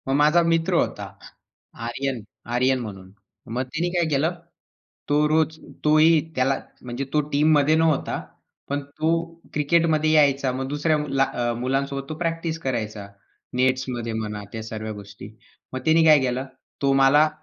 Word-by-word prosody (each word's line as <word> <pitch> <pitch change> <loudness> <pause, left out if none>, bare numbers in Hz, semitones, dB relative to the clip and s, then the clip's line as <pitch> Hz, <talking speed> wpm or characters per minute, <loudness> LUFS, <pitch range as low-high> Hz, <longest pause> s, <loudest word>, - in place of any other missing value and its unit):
मग 135 - +1
माझा 150 +4 +5
मित्र 165 -1 +1
होता - - 0 0.8
आर्यन, 130 0 -3 0.3
आर्यन 130 +1 +2
म्हणून. 95 -5 -8 0.4
मग 125 - 0
त्यानी 155 +7 -2
काय 175 -1 +2
केलं? 155 +4 +1 0.8
तो 150 +1 +3
रोज 160 0 +1 0.3
तोही 155 +2 +6 0.2
त्याला 130 +1 +1 0.2
म्हणजे 125 +2 -5
तो 150 - +4
टीममध्ये 150 +1 +4
नव्हता. 160 -2 +1 0.5
पण 140 +1 -1
तो 155 +3 -2 0.4
क्रिकेटमध्ये 155 +1 +2
यायचा. 140 -3 +3
मग 130 +1 -3
दुसऱ्याला 150 -1 +1
अ, 120 -3 -1
मुलांसोबत 135 +2 -2
तो 155 - -4
प्रॅक्टिस 165 -1 -2
करायचा. 110 -7 -3 0.5
नेट्समध्ये 125 -2 0
म्हणा 105 -2 -4
त्या 110 -1 -6
सर्व 110 0 -5
गोष्टी. 100 0 -10 0.4
मग 130 - -2
त्यानी 160 +1 +5
काय 155 -2 +7
केलं? 130 0 -1 0.4
तो 140 -1 +3
मला 135 +3 +5
140 Hz, 140 wpm, -24 LUFS, 125-155 Hz, 0.8 s, काय